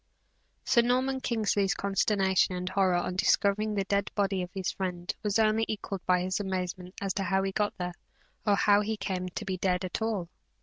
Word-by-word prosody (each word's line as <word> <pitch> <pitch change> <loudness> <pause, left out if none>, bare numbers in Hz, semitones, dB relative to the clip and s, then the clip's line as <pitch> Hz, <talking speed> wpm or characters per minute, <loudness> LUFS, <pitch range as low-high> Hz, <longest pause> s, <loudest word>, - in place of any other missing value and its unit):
Sir 235 - +5
Norman 255 +2 +1
Kingsley's 210 -5 +1
consternation 195 -2 +2
and 180 0 -4
horror 190 -2 +2
on 175 +1 -1
discovering 205 +3 +2
the 200 - +1
dead 200 0 0
body 195 -2 +1
of 180 - -4
his 190 -1 -2
friend, 180 -2 -3
was 210 -1 0
only 220 0 +3
equalled 200 -3 -4
by 180 -1 +4
his 185 +2 -1
amazement 185 -1 -4
as 195 -1 -2
to 195 - -2
how 190 +1 +1
he 195 - -1
got 205 +1 -1
there, 180 -1 -3 0.5
or 205 -2 +3
how 205 0 +4
he 220 +1 -2
came 185 -2 -3
to - - -6
be 190 -1 -2
dead 180 0 0
at 185 - -4
all. 215 -6 -1
195 Hz, 200 wpm, -29 LUFS, 185-210 Hz, 0.5 s, Sir